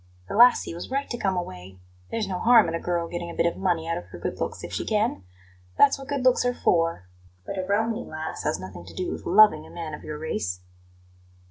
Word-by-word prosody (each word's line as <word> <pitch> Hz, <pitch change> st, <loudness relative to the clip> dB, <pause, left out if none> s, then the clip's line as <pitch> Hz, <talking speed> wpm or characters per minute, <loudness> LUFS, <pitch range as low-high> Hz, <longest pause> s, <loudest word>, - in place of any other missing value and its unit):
The -, -, -6 dB
lassie 240 Hz, -5 st, +6 dB
was 170 Hz, -, -7 dB
right 275 Hz, +2 st, -1 dB
to 240 Hz, -, -2 dB
come 190 Hz, -4 st, 0 dB
away. 95 Hz, -, -6 dB, 0.3 s
There's 225 Hz, -3 st, -2 dB
no 185 Hz, -2 st, -3 dB
harm 230 Hz, -3 st, +6 dB
in 165 Hz, -, -3 dB
a 165 Hz, -, -1 dB
girl 170 Hz, -1 st, -1 dB
getting 175 Hz, 0 st, -5 dB
a 170 Hz, -, -8 dB
bit 165 Hz, -, +1 dB
of 170 Hz, -, +1 dB
money 175 Hz, -4 st, 0 dB
out 165 Hz, -, -1 dB
of -, -, -12 dB
her 90 Hz, 0 st, -11 dB
good 85 Hz, -, -4 dB
looks -, -, -4 dB
if 85 Hz, 0 st, -7 dB
she 90 Hz, -, -2 dB
can 215 Hz, -, 0 dB, 0.6 s
that's 275 Hz, -1 st, +5 dB
what 270 Hz, -, -9 dB
good 280 Hz, -3 st, -2 dB
looks 255 Hz, -1 st, +4 dB
are 245 Hz, 0 st, 0 dB
for; 165 Hz, -, +1 dB, 0.4 s
but 195 Hz, -, -4 dB
a -, -, -1 dB
Romany 225 Hz, +4 st, 0 dB
lass 155 Hz, -4 st, -6 dB
has -, -, -1 dB
nothing 95 Hz, -2 st, -9 dB
to -, -, -12 dB
do 185 Hz, -, -2 dB
with -, -, -6 dB
LOVING 195 Hz, -5 st, +5 dB
a -, -, -14 dB
man 165 Hz, -3 st, -6 dB
of -, -, -8 dB
your 150 Hz, -, -6 dB
race." 95 Hz, -13 st, -3 dB
175 Hz, 245 wpm, -25 LUFS, 155-220 Hz, 0.6 s, lassie